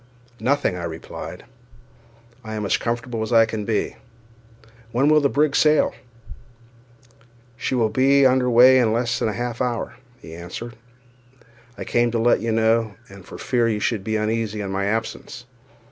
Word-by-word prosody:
"Nothing," 140 -7 0
I 90 - -6
replied; 80 -1 -7 1.0
"I 110 -1 -6
am 105 -1 -3
as - - +2
comfortable 120 -1 -3
as 115 0 +4
can 110 -2 -4
be; 110 -1 -2 0.9
when 135 +5 +2
will 155 0 +5
the 140 - +2
brig 145 +1 +1
sail?" 155 0 +3 1.6
"She 125 +1 -2
will 115 -3 +2
be 135 +4 +3
under 130 -1 +3
weigh 125 +2 +7
in 115 -3 +2
less 120 0 -1
than 110 - 0
half 120 +1 -4
an - - +2
hour," 120 0 -4 0.2
he 80 - -12
answered. 90 +8 -8 1.0
"I - - -5
came 120 0 +1
to 115 - -2
let 120 +2 +3
you 115 - -1
know, 110 -1 +1
and 100 -1 -13
for - - -11
fear 120 -2 0
you 105 -2 -1
should 105 -2 -1
be 110 +2 -2
uneasy 110 -1 -2
at 95 - -5
my 100 0 -1
absence. 110 +3 -4
115 Hz, 165 wpm, -22 LUFS, 110-125 Hz, 1.6 s, weigh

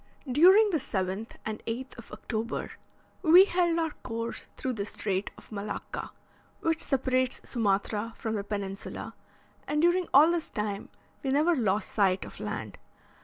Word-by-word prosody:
During 375 - +6
the 320 - +1
7th 200 -4 -3
and 215 0 -4
8th 250 +4 -4
of 230 - -12
October, 225 +1 -4 0.5
we 360 +2 +8
held 350 -3 +1
our 325 -2 0
course 230 -1 -5
through 260 - -2
the 205 -4 -3
Strait 195 -2 -2
of - - -16
Malacca, 205 0 -5 0.5
which 325 0 0
separates 255 -1 0
Sumatra 210 0 0
from 220 - -3
the 205 -2 -2
peninsula, 200 -1 -5 0.5
and 300 - 0
during 345 +2 +3
all 300 +5 +7
this 340 -2 -1
time 210 -2 -3 0.3
we 270 - -2
never 305 +6 +3
lost 210 -5 0
sight 195 -3 +2
of - - -11
land. - - -5
240 Hz, 150 wpm, -29 LUFS, 210-320 Hz, 0.5 s, we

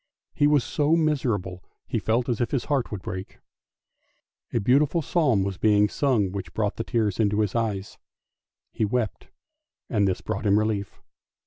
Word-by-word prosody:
He 145 - +3
was 145 -3 +3
so 150 +1 +1
miserable, 120 - -1 0.2
he - - -2
felt 115 +2 0
as 120 -2 -1
if 120 - 0
his 130 -4 -1
heart 140 -5 0
would 100 -3 -5
break. 95 +1 -6 1.1
A - - +1
beautiful 145 - +2
psalm 135 - +2
was 95 -1 -4
being 105 -1 +4
sung 120 -10 +1
which 95 -1 -6
brought 105 -2 -1
the 115 - -2
tears 110 -5 -1
into 105 -1 +2
his 105 -3 -1
eyes, 105 -4 -2 0.7
he - - -2
wept, 110 +1 -2 0.6
and 105 -3 +2
this 95 - -1
brought 110 - -3
him 100 +1 +4
relief. 105 -2 -2
110 Hz, 170 wpm, -25 LUFS, 100-130 Hz, 1.1 s, being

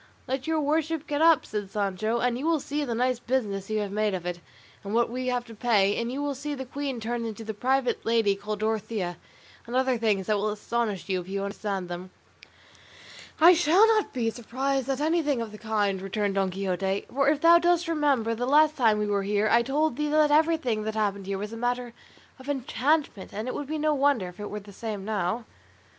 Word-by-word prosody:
"Let 265 +1 -3
your 320 -1 +1
worship 315 +1 0
get 295 +1 -2
up," 330 -2 +5
said 205 -2 -4
Sancho, 210 +2 -1
"and 245 0 +1
you 270 +6 -3
will 330 -2 +3
see 290 +2 -3
the 240 -5 -2
nice 250 +1 +1
business 210 -7 -2
you 215 -1 0
have 205 -1 -4
made 210 -1 0
of 175 -2 -6
it, 175 0 -3 0.4
and 200 +2 -3
what 235 0 +2
we 255 +1 -3
have 245 -1 -1
to 230 - -11
pay; 205 -3 +2
and 235 +1 -3
you 280 +3 -3
will 290 -1 -1
see 290 +2 -5
the 265 -1 -6
queen 270 -1 -4
turned 230 +1 -3
into 225 0 -7
a 220 - -2
private 255 +4 0
lady 225 -3 +2
called 210 +1 -5
Dorothea, 215 -5 -2 0.5
and 240 - -5
other 260 -2 +2
things 210 -4 +1
that 210 +1 +1
will 210 +1 0
astonish 210 -1 -2
you, 185 -2 0
if 175 - -13
you 195 0 -2
understand 200 -2 -3
them." 175 +1 -6 1.3
"I 340 +3 +9
shall 350 +5 +5
not 435 -2 +2
be 230 -4 -1
surprised 265 +3 -2
at 270 +1 -1
anything 305 -4 +1
of 230 -2 -4
the 210 - -11
kind," 205 -3 0
returned 200 +1 -1
Don 195 -1 +1
Quixote; 190 +1 -2
"for 275 +1 +3
if 300 -1 +2
thou 340 +1 +7
dost 345 0 +2
remember 285 -8 +1
the 245 +2 -2
last 305 +2 +5
time 225 -5 +3
we 210 - 0
were 205 -1 0
here 205 +2 +1
I 235 - +6
told 280 +3 0
thee 300 0 -1
that 300 0 +3
everything 310 -7 +2
that 220 0 -3
happened 200 -3 -1
here 195 0 -2
was 210 +3 -5
a - - -6
matter 245 0 -2 0.5
of 260 +2 -10
enchantment, 275 -3 -1
and 215 +4 -4
it 255 - -2
would 290 - -5
be 310 +2 -3
no 305 0 +1
wonder 280 -8 +2
if 180 - -15
it 205 - -5
were 210 - -5
the 200 0 -14
same 210 -2 -5
now." 215 +2 -1
235 Hz, 225 wpm, -27 LUFS, 205-280 Hz, 1.3 s, I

